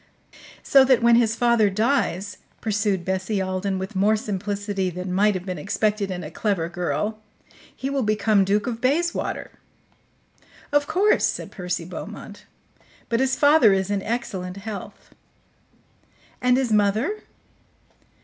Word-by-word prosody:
"So 270 -1 +6
that 255 -3 +3
when 235 0 +6
his 225 -1 +3
father 235 -3 +3
dies," 205 -3 0 0.2
pursued 205 -4 -1
Bessie 190 +2 -1
Alden 190 +1 -2
with 190 +2 -6
more 205 +3 +3
simplicity 205 -2 -3
than 180 +1 -5
might 205 +2 +3
have 185 0 -5
been 180 -4 -4
expected 205 +3 -1
in 180 -1 -4
a 150 - -8
clever 190 -3 -1
girl, 175 +5 -2 0.6
"he 265 - -4
will 275 0 -1
become 215 -2 +2
Duke 205 +2 +1
of 235 -2 -4
Bayswater?" 330 +7 -1 1.2
"Of 290 0 +2
course," 380 +7 +3
said - - -5
Percy 180 -3 -4
Beaumont. 205 +3 -9 0.6
"But 230 - +1
his 265 0 +1
father 285 -8 +5
is 190 +1 -1
in 200 -1 0
excellent 195 -5 -4
health." 200 0 -8 1.3
"And 250 0 +3
his 255 -4 0
mother?" 215 - +1
205 Hz, 140 wpm, -23 LUFS, 190-235 Hz, 1.3 s, So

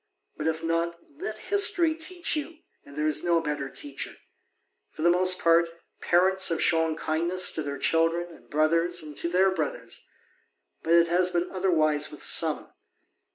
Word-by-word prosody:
But, 155 - -4
if 160 0 -2
not, 165 +1 -2 0.2
let 395 - -5
history 400 -5 +3
teach 335 +1 -1
you, 310 +2 -5 0.3
and 140 - -15
there 150 +1 -2
is 155 -1 -1
no 170 -1 +2
better 150 -3 -4
teacher. 140 0 -5 0.7
For 155 - -8
the 170 - +4
most 185 +1 +3
part, 170 0 +3 0.3
parents 190 +2 +2
have 165 -2 -2
shown 160 -1 +1
kindness 170 +4 +1
to 155 - -3
their 140 -1 -5
children 165 +1 0
and - - -22
brothers 165 +3 +1
to 170 - -2
their 190 +2 +2
brothers, 160 -5 -5 0.8
but 165 - 0
it 170 0 +5
has 180 +1 +2
been 175 0 -2
otherwise 155 -6 0
with - - -8
some. - - +2
170 Hz, 160 wpm, -26 LUFS, 160-185 Hz, 0.8 s, it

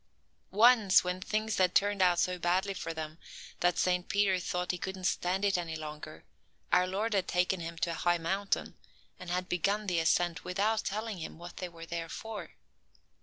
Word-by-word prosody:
Once, 215 -2 +6
when 180 +1 -3
things 215 +2 -1
had 185 -1 +3
turned 205 -1 +3
out 180 -1 +4
so 180 0 +1
badly 185 +3 +1
for 180 - -5
them 160 0 -6 0.4
that 175 -1 +2
Saint 180 +1 +1
Peter 200 -3 +2
thought 180 0 -2
he 180 - -5
couldn't 190 0 -5
stand 185 +2 0
it 195 -3 +2
any 165 -2 -4
longer, 155 0 -8 0.5
our 180 0 +4
Lord 210 +4 -1
had 195 -2 +1
taken 180 +1 +1
him 165 0 -6
to 170 +1 0
a 165 - -5
high 175 0 +3
mountain, 195 +4 -1 0.4
and 180 - -8
had 180 +1 -1
begun 200 +5 0
the 180 -4 +1
ascent 165 -1 +1
without 210 +4 0
telling 215 -1 -3
him 160 - -7
what 175 +1 -10
they 180 - -4
were 165 -1 -10
there 165 0 -4
for. 220 +2 -7
180 Hz, 190 wpm, -31 LUFS, 170-200 Hz, 0.5 s, Once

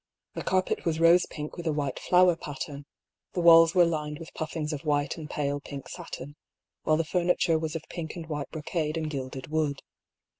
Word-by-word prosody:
The - - -4
carpet 185 0 0
was 160 -2 0
rose 170 +2 +6
pink 150 +2 -7
with 170 -1 -5
a - - +3
white 145 -3 -2
flower 180 -1 +5
pattern, 140 -1 -7 0.5
the - - -2
walls 165 0 +7
were 175 -1 +7
lined 150 -2 -2
with 165 0 -10
puffings 155 -1 -3
of 145 - -5
white 145 -2 0
and 155 -2 -8
pale 145 -1 -1
pink 140 -1 -8
satin, 145 +3 -8 0.5
while 155 - +2
the 165 - +1
furni 180 +2 +1
ture 165 -2 +2
was 160 0 -3
of 160 - -4
pink 165 -3 -6
and 170 -2 -6
white 150 -4 -4
brocade 155 0 -2
and 155 -1 -2
gilded 130 -1 -5
wood. 155 -3 -1
155 Hz, 200 wpm, -28 LUFS, 145-165 Hz, 0.5 s, walls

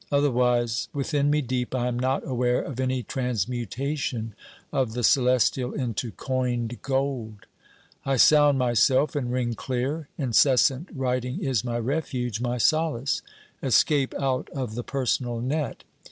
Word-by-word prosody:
Otherwise, 125 -4 +2
within 145 0 0
me 150 +1 +2
deep, 125 0 -2
I 125 -1 0
am 120 0 -2
not 130 +2 0
aware 125 -1 +1
of 130 -3 -7
any 130 -1 0
transmutation 125 +1 -3 0.4
of 130 -5 0
the 120 +1 -3
celestial 125 0 +3
into 120 -3 -2
coined 120 +1 -2
gold. 130 -6 -2 0.6
I 135 -1 0
sound 145 +1 +6
myself, 130 +5 +3
and 125 -4 -1
ring 125 -2 0
clear. 135 +6 -3
Incessant 135 - +3
writing 125 -1 -1
is 130 -7 0
my 120 -1 -2
refuge, 125 -3 -2
my 125 0 -1
solace 150 0 +1 0.4
escape 135 +2 +2
out 130 -2 -1
of 130 -5 -3
the 120 +2 -4
personal 125 -3 -1
net. 140 +5 -2
130 Hz, 135 wpm, -25 LUFS, 120-135 Hz, 0.6 s, sound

